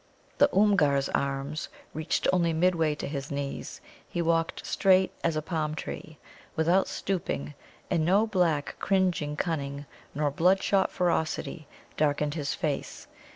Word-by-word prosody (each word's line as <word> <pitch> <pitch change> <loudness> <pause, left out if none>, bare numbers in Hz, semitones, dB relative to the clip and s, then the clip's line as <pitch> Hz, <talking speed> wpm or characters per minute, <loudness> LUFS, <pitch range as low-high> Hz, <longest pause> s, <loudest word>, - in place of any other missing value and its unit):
The - - +7
Oomgar's 160 -10 +3
arms 140 +3 -2 0.2
reached 155 +1 -1
only 170 -2 +2
midway 165 -2 +2
to - - -5
his 140 -1 -4
knees; 140 -1 -5 0.3
he - - -4
walked 165 -1 0
straight 190 -1 +3
as 165 -2 +1
a 155 - -1
palm 155 -2 -2
tree, 155 0 -7 0.4
without 170 +4 +3
stooping, 75 - -3 0.3
and 160 - +1
no 195 +6 +4
black, 175 -9 +1
cringing 180 -6 +1
cunning 145 -4 -2 0.3
nor 145 0 +1
bloodshot 190 +5 +3
ferocity 170 -3 -1 0.3
darkened 150 -1 +1
his 145 -3 -2
face. 150 -6 -3
160 Hz, 130 wpm, -28 LUFS, 145-180 Hz, 0.4 s, The